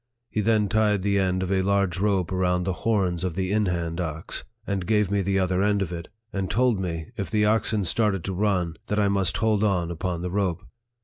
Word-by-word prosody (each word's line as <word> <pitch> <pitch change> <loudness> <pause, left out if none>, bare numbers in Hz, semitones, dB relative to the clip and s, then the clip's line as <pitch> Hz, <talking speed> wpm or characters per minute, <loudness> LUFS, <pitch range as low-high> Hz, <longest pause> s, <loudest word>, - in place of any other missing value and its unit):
He 110 - 0
then 110 -1 +2
tied 105 -2 +2
the 100 0 +2
end 95 -1 +1
of 95 - -3
a 95 -1 +2
large 100 -2 +1
rope 95 -4 +1
around 90 -1 +1
the 95 +1 -1
horns 95 -4 0
of 90 -3 -2
the 95 0 -1
in 105 -1 +2
hand 85 -1 -2
ox, 80 +1 -4 0.2
and 95 -4 -2
gave 105 -2 +2
me 100 0 +2
the 95 +1 0
other 95 0 +1
end 100 -1 +2
of 90 - -6
it, 85 -2 -6 0.3
and 95 -2 -2
told 125 -3 +2
me, 85 -4 -4
if 100 - -3
the 105 -1 +2
oxen 110 -1 +2
started 100 -1 +1
to 95 - -3
run, 90 -4 0
that 105 - -1
I 100 -1 +3
must 100 0 +1
hold 110 0 +2
on 90 -5 +1
upon 85 0 -3
the 90 - -3
rope. 95 -3 -1
95 Hz, 230 wpm, -25 LUFS, 90-105 Hz, 0.3 s, I